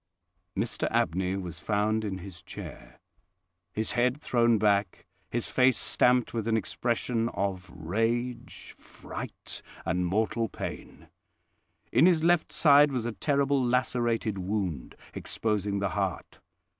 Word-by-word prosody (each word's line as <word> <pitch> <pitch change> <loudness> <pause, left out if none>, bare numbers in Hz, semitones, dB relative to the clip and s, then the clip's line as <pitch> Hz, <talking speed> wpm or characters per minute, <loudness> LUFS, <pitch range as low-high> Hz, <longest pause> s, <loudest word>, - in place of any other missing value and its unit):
Mr - - -1
Abney 95 +3 0
was 90 -4 -5
found 105 +3 0
in 100 -3 -3
his 90 -2 -10
chair, - - -10 0.7
his 110 +1 -2
head 125 +3 +1
thrown 120 -5 +3
back, 100 -2 +1 0.2
his 120 -1 -2
face 130 -1 +3
stamped 125 0 +2
with 115 -2 -2
an 110 -1 +2
expression 115 +2 -1
of 95 -2 -2
rage, 115 +9 -2
fright, - - -8 0.2
and 90 +1 0
mortal 110 +4 0
pain. - - -7 0.8
In 160 - +6
his 165 -4 +3
left 175 0 +3
side 145 -1 +6
was 125 -4 -2
a 120 - -1
terrible 140 +2 +1
lacerated 120 -4 0
wound, 95 -7 -3 0.2
exposing 105 -2 -1
the 100 -1 0
heart. 95 -4 -3
110 Hz, 125 wpm, -28 LUFS, 95-125 Hz, 0.8 s, In